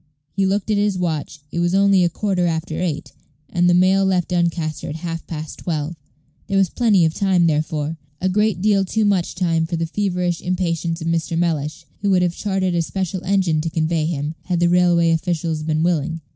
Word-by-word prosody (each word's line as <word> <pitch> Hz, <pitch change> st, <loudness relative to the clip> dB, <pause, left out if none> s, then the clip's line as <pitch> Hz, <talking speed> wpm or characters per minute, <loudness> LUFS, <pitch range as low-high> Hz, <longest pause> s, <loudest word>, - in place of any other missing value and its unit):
He 195 Hz, 0 st, +2 dB
looked 200 Hz, +2 st, 0 dB
at 210 Hz, -, +2 dB
his 205 Hz, -2 st, +1 dB
watch; 155 Hz, -4 st, -3 dB
it 170 Hz, -, -2 dB
was 175 Hz, +2 st, +1 dB
only 195 Hz, -1 st, +4 dB
a 175 Hz, -, +3 dB
quarter 180 Hz, -1 st, 0 dB
after 160 Hz, 0 st, -2 dB
eight, 165 Hz, -5 st, -3 dB, 0.4 s
and 175 Hz, 0 st, +3 dB
the 175 Hz, -, +4 dB
mail 190 Hz, +2 st, +4 dB
left 185 Hz, -3 st, +1 dB
Doncaster 170 Hz, -3 st, -1 dB
at 150 Hz, -, -5 dB
half 165 Hz, 0 st, -5 dB
past 155 Hz, -2 st, -6 dB
twelve. 160 Hz, -1 st, -3 dB, 0.5 s
There 195 Hz, -, 0 dB
was 195 Hz, -2 st, +3 dB
plenty 210 Hz, -8 st, +3 dB
of 160 Hz, -, +1 dB
time, 185 Hz, -3 st, +2 dB
therefore; 155 Hz, 0 st, -1 dB, 0.2 s
a 185 Hz, -, 0 dB
great 205 Hz, -1 st, +1 dB
deal 205 Hz, -2 st, +3 dB
too 215 Hz, +3 st, 0 dB
much 195 Hz, -4 st, +1 dB
time 165 Hz, -3 st, +1 dB
for 170 Hz, -, -2 dB
the 165 Hz, 0 st, -1 dB
feverish 180 Hz, -1 st, -1 dB
impatience 170 Hz, -2 st, -1 dB
of 160 Hz, -, -3 dB
Mr. 165 Hz, 0 st, -1 dB
Mellish, 155 Hz, -3 st, -1 dB, 0.2 s
who 200 Hz, -, +1 dB
would 185 Hz, -2 st, +4 dB
have 175 Hz, -1 st, +1 dB
chartered 190 Hz, -3 st, -1 dB
a 170 Hz, -, +2 dB
special 190 Hz, +2 st, -3 dB
engine 185 Hz, -5 st, +1 dB
to 165 Hz, -, -2 dB
convey 160 Hz, -1 st, 0 dB
him, 150 Hz, -2 st, -2 dB
had 180 Hz, -2 st, 0 dB
the 175 Hz, 0 st, +3 dB
railway 175 Hz, -1 st, +4 dB
officials 165 Hz, -1 st, -1 dB
been 155 Hz, 0 st, 0 dB
willing. 165 Hz, -1 st, 0 dB
175 Hz, 205 wpm, -21 LUFS, 160-190 Hz, 0.5 s, only